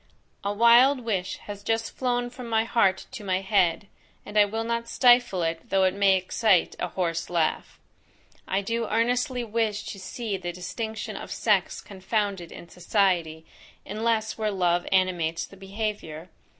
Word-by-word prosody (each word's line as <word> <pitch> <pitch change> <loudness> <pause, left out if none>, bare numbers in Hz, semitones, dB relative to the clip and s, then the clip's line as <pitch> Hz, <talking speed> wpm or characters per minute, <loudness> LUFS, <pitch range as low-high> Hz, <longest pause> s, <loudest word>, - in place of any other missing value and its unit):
A 200 - -1
wild 235 +5 +5
wish 200 -6 -2
has 205 -1 -8
just 225 +1 -1
flown 245 -1 -1
from 245 -1 -9
my 225 -1 +2
heart 195 -5 +1
to 245 -5 -8
my 190 -1 0
head, 190 -2 +2 0.4
and 205 - -10
I 210 -1 +6
will 220 +2 -3
not 235 0 -3
stifle 240 -8 +4
it 165 0 -3
though 195 -1 +3
it 185 -1 +3
may 195 -1 +4
excite 185 0 +2
a - - -1
horse 170 -2 -2
laugh. 170 -3 -1 0.7
I 195 +1 0
do 230 +3 -2
earnestly 245 +2 0
wish 220 -2 -1
to 200 - -7
see 205 +2 -4
the 175 -1 -5
distinction 220 +5 -5
of - - -7
sex - - +1
confounded 195 -2 -3
in 170 - -10
society, 175 -3 0 0.4
unless 220 +1 -1
where 215 -1 0
love 175 -3 +1
animates 175 -4 +1
the - - -15
behaviour. 195 -4 -5
205 Hz, 160 wpm, -26 LUFS, 185-230 Hz, 0.7 s, I